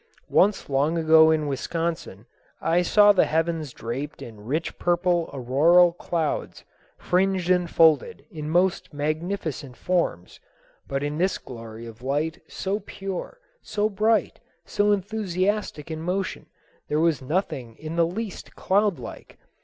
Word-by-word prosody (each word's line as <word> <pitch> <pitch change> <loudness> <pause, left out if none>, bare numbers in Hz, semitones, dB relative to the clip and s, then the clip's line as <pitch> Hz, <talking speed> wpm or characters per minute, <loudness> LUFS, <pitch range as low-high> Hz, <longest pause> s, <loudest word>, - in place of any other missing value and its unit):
Once 205 +1 +3
long 145 +4 +1
ago 160 -1 +6
in 155 -1 +2
Wisconsin 150 - -3 0.3
I 170 +2 +2
saw 205 +3 +6
the 195 - +3
heavens 160 -2 -1
draped 130 +6 -6
in 110 -3 -11
rich 150 +9 -3
purple 175 -1 +1
auroral 155 +7 +4
clouds 170 -3 -3 0.3
fringed 185 0 +1
and 180 -1 +2
folded 155 -4 +3
in 155 -1 -6
most 175 -2 +1
magnificent 155 - -3
forms; 170 - -1 0.5
but 135 0 -2
in 145 +2 -3
this 185 +2 +1
glory 115 -2 -10
of 115 0 -11
light, 145 +5 -2
so 195 +2 -3
pure, 195 - -6 0.2
so 210 0 -1
bright, 215 +3 +1 0.3
so 205 0 +1
enthusiastic 200 -4 -1
in 160 0 -4
motion, 185 +3 -3 0.4
there 150 - 0
was 165 -3 +2
nothing 130 - -2
in 155 +4 -7
the 170 -1 +3
least 205 +2 -6
cloud 200 -1 +1
like. 120 - -10
165 Hz, 135 wpm, -25 LUFS, 145-185 Hz, 0.5 s, ago